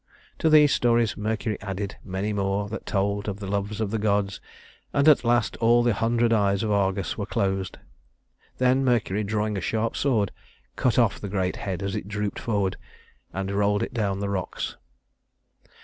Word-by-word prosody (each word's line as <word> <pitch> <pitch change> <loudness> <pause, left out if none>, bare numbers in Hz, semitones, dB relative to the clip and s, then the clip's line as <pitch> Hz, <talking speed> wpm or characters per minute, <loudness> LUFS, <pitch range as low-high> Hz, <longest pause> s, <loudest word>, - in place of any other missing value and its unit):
To 160 - +3
these 150 -2 +6
stories 120 -2 +2
Mercury 110 0 -2
added 100 0 -4
many 95 +2 -3
more 100 0 -1
that 110 - -6
told 100 +1 0
of 100 0 -5
the 100 - -6
loves 100 +2 -2
of 105 -3 -1
the 110 - -1
gods, 100 -2 0 0.5
and 140 +1 +3
at 150 -4 +6
last 120 -2 +1
all 120 +1 +4
the 120 -1 +3
hundred 115 +2 +2
eyes 100 -2 +2
of 110 - 0
Argus 100 -2 0
were - - -3
closed. 95 -1 -1 0.8
Then 130 +1 +3
Mercury, 110 -5 +1
drawing 105 0 -1
a - - -3
sharp 110 +5 -1
sword, 110 -8 +1 0.4
cut 125 - +1
off 115 -5 +3
the 100 - -5
great 95 -2 -1
head 95 -1 -4
as 100 -1 -2
it 90 - -4
drooped 105 0 -3
forward, 100 -5 -1 0.5
and 95 0 -3
rolled 100 +1 +1
it - - -5
down 100 -5 0
the 100 0 -2
rocks. 95 -2 -3
105 Hz, 180 wpm, -25 LUFS, 100-115 Hz, 0.8 s, these